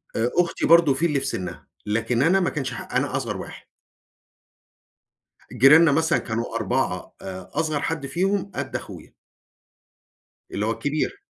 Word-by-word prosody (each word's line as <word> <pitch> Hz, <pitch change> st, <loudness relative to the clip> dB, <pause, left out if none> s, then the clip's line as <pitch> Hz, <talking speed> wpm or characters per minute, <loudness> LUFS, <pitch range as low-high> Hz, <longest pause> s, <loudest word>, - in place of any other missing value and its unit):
آآ 115 Hz, +2 st, 0 dB
أختي 175 Hz, -1 st, +1 dB
برضو 165 Hz, -4 st, +6 dB
في 155 Hz, +6 st, 0 dB
اللي 150 Hz, -4 st, +1 dB
في 135 Hz, -, -5 dB
سنها، 90 Hz, -9 st, -5 dB, 0.2 s
لكن 115 Hz, +3 st, 0 dB
أنا 185 Hz, +4 st, +4 dB
ما 180 Hz, -, +1 dB
كانش 140 Hz, -4 st, -4 dB
ح -, -, -7 dB
أنا -, -, 0 dB
أصغر -, -, -3 dB
واحد. -, -, -9 dB, 1.9 s
جيراننا 145 Hz, +6 st, +7 dB
مثلًا 160 Hz, +3 st, +2 dB
كانوا 115 Hz, 0 st, -4 dB
4 110 Hz, -4 st, -1 dB
آآ 95 Hz, -1 st, -8 dB
أصغر 155 Hz, -1 st, -1 dB
حد 160 Hz, -3 st, -2 dB
فيهم 195 Hz, +6 st, -1 dB
قد -, -, -4 dB
أخويا. -, -, -8 dB, 1.4 s
اللي 105 Hz, -, -2 dB
هو 110 Hz, -, 0 dB
الكبير. 155 Hz, -, -2 dB
145 Hz, 150 wpm, -24 LUFS, 115-165 Hz, 1.9 s, جيراننا